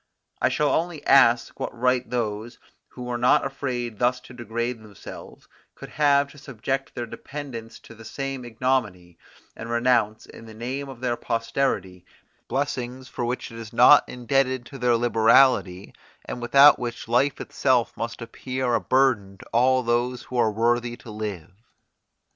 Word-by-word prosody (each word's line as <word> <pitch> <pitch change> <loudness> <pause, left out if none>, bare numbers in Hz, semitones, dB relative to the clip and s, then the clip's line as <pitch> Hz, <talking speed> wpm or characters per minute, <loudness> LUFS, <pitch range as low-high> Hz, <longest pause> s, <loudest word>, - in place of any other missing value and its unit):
I - - +3
shall 150 -1 +1
only 165 -3 -2
ask 120 -3 +4
what - - -5
right 125 0 +1
those, 115 -1 -3 0.3
who 125 - -10
were 125 -1 -3
not 125 +3 +4
afraid 125 -5 -4
thus 125 +1 +2
to 125 - -14
degrade 120 0 -4
themselves, 105 -2 -12 0.3
could - - -10
have 145 -1 +2
to 145 - -15
subject 135 0 -4
their 120 - -3
dependants 120 -2 -8
to - - -14
the 115 0 -14
same 135 +2 -5
ignominy, 115 -7 -2 0.4
and 115 - -8
renounce, 120 -2 +1
in 115 - -13
the 110 - -12
name 130 +5 -5
of 130 -2 -11
their 125 -2 0
posterity, 115 -6 -2 0.4
blessings 130 -1 -3
for 120 - -4
which 120 0 -4
it 115 - -9
is 110 0 -9
not 125 +5 +7
indebted 130 0 0
to 135 - -11
their 120 -1 +3
liberality, 115 -4 +3 0.3
and 120 - -6
without 140 +4 +6
which 120 -2 -5
life 125 +4 +1
itself 130 -4 0
must 115 0 -5
appear 125 +1 -3
a - - +2
burthen 120 -8 +1
to - - -14
all 130 +2 +3
those 120 +1 0
who 125 - -9
are 115 - +3
worthy 120 +2 0
to 120 - -12
live. 105 -5 -6
120 Hz, 160 wpm, -24 LUFS, 115-130 Hz, 0.4 s, not